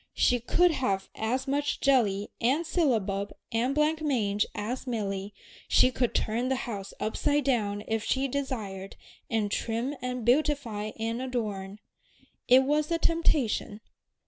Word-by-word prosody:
She 245 - +3
could 345 +9 +3
have 195 -10 -1
as 250 +5 -2
much 285 +1 0
jelly 210 -7 +2
and 270 +8 +2
syllabub 215 - 0 0.2
and 245 +4 +1
blanc 305 +1 +2
mange 210 -9 +1
as 240 +6 -4
Milly, 200 -4 -2 0.4
she 255 - +5
could 245 -1 -1
turn 235 +4 0
the 265 - +2
house 200 -5 -5
upside 290 +6 0
down 210 -6 0
if 220 -1 -1
she 265 +4 +1
desired, 220 -8 -4 0.3
and 215 -3 0
trim 235 +6 -1
and 250 -2 -3
beautify 245 -5 +1
and 230 +2 -2
adorn. 210 -6 -3 0.7
It 255 +2 +7
was 295 +3 +1
a 335 - +1
temptation. 300 -11 +1
240 Hz, 140 wpm, -28 LUFS, 210-275 Hz, 0.7 s, It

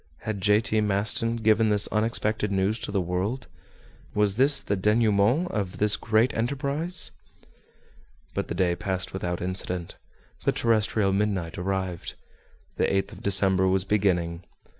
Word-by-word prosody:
Had 110 -3 -4
J. 105 +2 +4
T. 110 -1 +1
Maston 105 +3 +1
given 110 -1 +3
this 105 -1 +2
unexpected 110 -1 0
news 100 +3 0
to - - -5
the 100 - +1
world? 95 +8 -2 0.7
Was 105 -1 +2
this 135 +4 +4
the 100 - -2
denouement 105 - +2
of 100 -4 -3
this 105 0 +2
great 110 +3 +2
enterprise? 140 +8 -1 1.2
But - - -2
the - - -4
day 90 -1 +1
passed 95 -1 -2
without 90 -2 -3
incident. 90 -1 -4 0.5
The - - +2
terrestrial 110 -3 +1
midnight 100 -5 -1
arrived. 95 -2 -3 0.6
The - - +2
8th 95 0 0
of - - -11
December 95 -1 +3
was 95 0 +1
beginning. 90 -4 0
100 Hz, 140 wpm, -26 LUFS, 95-110 Hz, 1.2 s, J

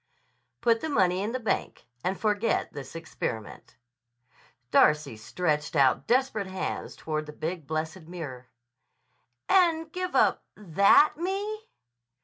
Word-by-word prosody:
"Put 230 -1 +3
the 315 - -3
money 185 -9 +2
in 210 +3 -2
the 255 - -2
bank. 220 -4 -2 0.2
And 185 +1 -1
forget 210 +1 0
this 140 0 -8
experiment." 115 -9 -6 1.0
Darcy 150 -5 +4
stretched 150 +7 -2
out 135 -3 +3
desperate 245 -5 +1
hands 190 0 -4
toward 155 -1 -4
the 150 - -8
big, 160 -1 -5
blessed 160 +2 -4
mirror. 140 -8 -8 1.0
"And 330 -4 +3
give 365 +1 -4
up - - +3
that 200 - +4
Me?" 410 +5 -3
185 Hz, 125 wpm, -27 LUFS, -, 1.0 s, Darcy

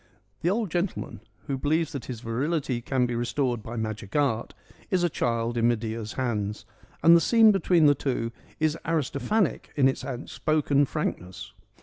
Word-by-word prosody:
The 170 - +2
old 210 -2 0
gentleman, 175 +2 -2 0.3
who 135 -3 -3
believes 155 +3 +1
that 140 -4 -6
his 120 -3 -6
virility 130 +2 -1
can 130 +1 +1
be 120 - -2
restored 120 0 -1
by 115 +3 -7
magic 110 -3 -4
art, 135 -6 0 0.3
is 185 -2 +1
a 175 - +2
child 115 -1 -1
in 115 0 +3
Medea's 110 -1 -2
hands, 105 -5 -2 0.4
and 165 +1 +8
the 170 - +5
scene 225 +1 +6
between 180 -5 +3
the 145 - +7
two 125 -4 -2 0.3
is 155 0 +2
Aristophanic 160 - 0
in 135 -3 +4
its 135 -1 -1
outspoken 140 +2 0
frankness. 90 - -4
135 Hz, 160 wpm, -26 LUFS, 115-155 Hz, 0.4 s, and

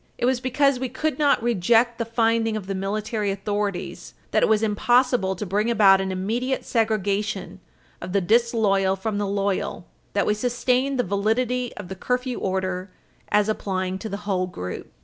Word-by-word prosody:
It 240 - 0
was 255 0 +2
because 260 +1 +2
we 260 0 -2
could 305 +5 -2
not 285 -6 +3
reject 235 +2 +2
the 230 - 0
finding 225 -1 +1
of 205 - -6
the 195 - -3
military 210 +2 -2
authorities 200 0 -3 0.2
that - - +3
it - - +3
was 220 0 +3
impossible 235 -1 +2
to 210 - -5
bring 205 +4 0
about 195 -4 +5
an 190 0 -2
immediate 230 +8 -2
segregation 205 -4 -1 0.4
of - - -6
the 200 - +2
disloyal 205 -2 +2
from 205 +2 -3
the 205 - -1
loyal 195 -2 -2 0.3
that 200 -2 +1
we 210 - +2
sustained 250 +4 0
the 245 - +2
validity 235 +5 0
of 205 - -7
the 190 - -6
curfew 250 +5 -2
order 185 0 -2 0.4
as 210 0 +3
applying 190 -3 -2
to 220 - -6
the 200 - -4
whole 185 -3 0
group. 90 - -7
210 Hz, 175 wpm, -24 LUFS, 195-240 Hz, 0.4 s, about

